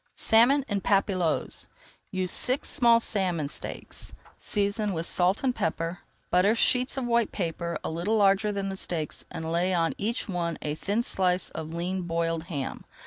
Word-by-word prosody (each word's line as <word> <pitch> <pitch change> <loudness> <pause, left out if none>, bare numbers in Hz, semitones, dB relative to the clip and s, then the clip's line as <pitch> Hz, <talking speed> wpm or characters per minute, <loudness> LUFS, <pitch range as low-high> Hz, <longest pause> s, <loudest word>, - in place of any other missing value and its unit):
SALMON 250 +5 +4
EN 205 -2 -1
PAPILLOTES 190 -4 0 0.4
Use 185 -1 -1
six 255 +3 0
small 235 -2 +5
salmon 185 -9 0
steaks. - - -6 0.3
Season 205 0 0
with 165 -1 -2
salt 185 +7 +2
and 260 -2 +2
pepper. 165 -2 -2 0.3
Butter 190 +5 +4
sheets 250 +3 +2
of 265 - -1
white 235 -2 +2
paper 170 -2 -3
a - - -3
little 175 +7 0
larger 200 0 +3
than 200 -1 -2
the 190 - -4
steaks 160 -5 -2
and 165 -1 -5
lay 180 +2 +1
on 165 -1 +1
each 230 +4 -2
one 170 -4 -2
a 150 - -1
thin 205 +9 -1
slice 185 -4 +2
of 160 0 -6
lean 180 +3 -2
boiled 165 -1 -1
ham. 145 -6 -5
185 Hz, 165 wpm, -27 LUFS, 170-215 Hz, 0.4 s, small